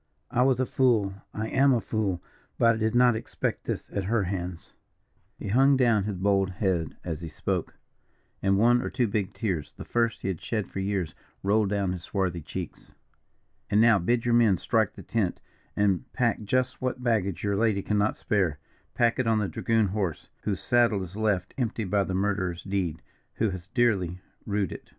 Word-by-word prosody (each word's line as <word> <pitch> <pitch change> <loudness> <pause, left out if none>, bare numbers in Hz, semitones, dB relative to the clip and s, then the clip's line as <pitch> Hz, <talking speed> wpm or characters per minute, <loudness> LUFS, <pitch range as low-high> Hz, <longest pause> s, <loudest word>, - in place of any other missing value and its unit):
I 125 - +2
was 130 -1 +3
a 130 - +2
fool 115 -7 +2 0.2
I 110 +1 -3
am 135 0 +4
a - - +2
fool, 105 -6 -2 0.3
but 115 0 +5
I - - -3
did 110 +1 0
not 120 -1 +5
expect 110 - -3
this - - -3
at 100 -2 -2
her 110 +1 +1
hands." 90 -2 -5 0.6
He 100 - -6
hung 135 +5 +5
down 115 -6 +3
his 105 -3 -3
bold 95 0 +2
head 90 -4 -1
as 85 -2 -4
he 85 - -5
spoke, - - -3 0.7
and 95 0 +3
one 120 +3 +4
or - - -3
two 125 -2 +1
big 100 -2 -1
tears, 95 -10 -3
the - - -8
first 115 -2 0
he - - -1
had 90 -4 -4
shed 110 -4 -2
for - - -4
years, 95 -4 -1 0.3
rolled 105 +1 +2
down 100 -2 0
his 90 -1 -4
swarthy 90 -2 -2
cheeks. 75 - -7 0.8
"And 105 - +3
now 115 -2 +6
bid 115 +7 +1
your 120 - +2
men 115 -5 +5
strike 110 +3 +1
the - - -10
tent, 105 -6 -1 0.4
and 100 -3 +1
pack 120 -3 +1
just 130 +4 0
what 130 0 -2
baggage 105 -7 0
your 100 -1 +1
lady 105 -2 +1
cannot 105 0 +1
spare. 95 -9 0 0.4
Pack 120 0 +2
it 130 - +1
on 110 -1 +3
the 105 -2 0
dragoon 110 +4 +1
horse, 95 -5 -3
whose 100 -3 -2
saddle 115 -5 +3
is 90 +1 -9
left 105 -3 0
empty 115 -2 -1
by 100 +1 +1
that - - -4
murderer's 95 -3 -1
deed, 90 -5 -2 0.3
who 110 -3 +1
has 90 -1 -7
dearly 95 -8 +2 0.3
rued 100 -3 0
it. - - -9
105 Hz, 195 wpm, -27 LUFS, 95-115 Hz, 0.8 s, now